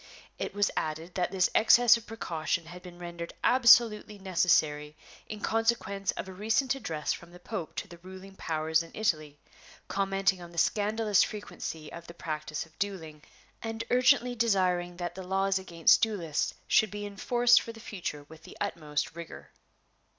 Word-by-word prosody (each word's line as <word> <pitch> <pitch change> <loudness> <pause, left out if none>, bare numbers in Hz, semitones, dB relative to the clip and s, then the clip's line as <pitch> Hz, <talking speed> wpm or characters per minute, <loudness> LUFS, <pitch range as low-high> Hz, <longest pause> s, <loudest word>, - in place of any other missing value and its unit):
It - - -4
was 205 0 +2
added 160 +3 -3
that 180 -2 0
this 185 -1 +1
excess 240 +2 +6
of 230 -1 -7
precaution 170 -6 -3
had 175 +2 -10
been 180 -1 -12
rendered 170 -1 -7
absolutely 235 -4 +5
necessary 155 -6 +1 0.3
in 215 -1 -7
consequence 220 -4 0
of - - -6
a 190 - -8
recent 225 +7 +1
address 160 - -3
from 170 - -10
the 175 +1 -14
Pope 180 -3 -6
to - - -4
the 170 - -13
ruling 190 +2 -12
powers 160 -2 0
in 165 - -9
Italy 155 -9 -1 0.5
commenting 195 -1 0
on 175 - -9
the 170 - -15
scandalous 210 +4 +2
frequency 165 -6 -5
of 170 0 -9
the 170 - -11
practice 155 -2 -4
of 160 - -25
dueling, 165 -7 -4 0.4
and 225 0 -4
urgently 250 0 +4
desiring 185 -6 +1
that 175 -1 -4
the 190 - -8
laws 195 +1 0
against 170 -3 +3
duelists 190 -9 -1
should 220 - +4
be 205 +1 -6
enforced 240 +4 +3
for 230 - -7
the 225 - -13
future 180 -9 -6
with 155 +2 -15
the - - -13
utmost 150 -1 -3
rigor. 170 -1 -10
185 Hz, 165 wpm, -29 LUFS, 165-215 Hz, 0.5 s, excess